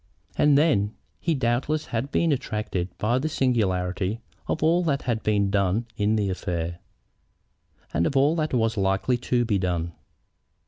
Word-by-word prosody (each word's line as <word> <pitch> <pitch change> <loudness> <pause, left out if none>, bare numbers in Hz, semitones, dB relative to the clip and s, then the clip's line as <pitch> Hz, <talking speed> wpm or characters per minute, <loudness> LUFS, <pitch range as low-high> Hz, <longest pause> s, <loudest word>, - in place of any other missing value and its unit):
And 145 -1 +4
then 110 -10 +2 0.2
he 165 -2 0
doubtless 130 +4 0
had 125 +5 -1
been 165 0 +2
attracted 105 -8 -2
by 120 +4 +1
the 155 +4 -1
singularity 100 -6 0 0.3
of 155 - -1
all 170 +3 +4
that 140 -4 0
had 115 -3 -1
been 100 -2 +1
done 100 +3 +1
in 105 0 +1
the 100 -3 0
affair, 85 -2 -3 1.1
and 85 - +2
of 140 - 0
all 145 +4 +4
that 155 -1 0
was 115 -2 +1
likely 95 +6 +1
to 120 0 0
be 105 -4 +1
done. 85 -2 -1
110 Hz, 155 wpm, -25 LUFS, 95-135 Hz, 1.1 s, And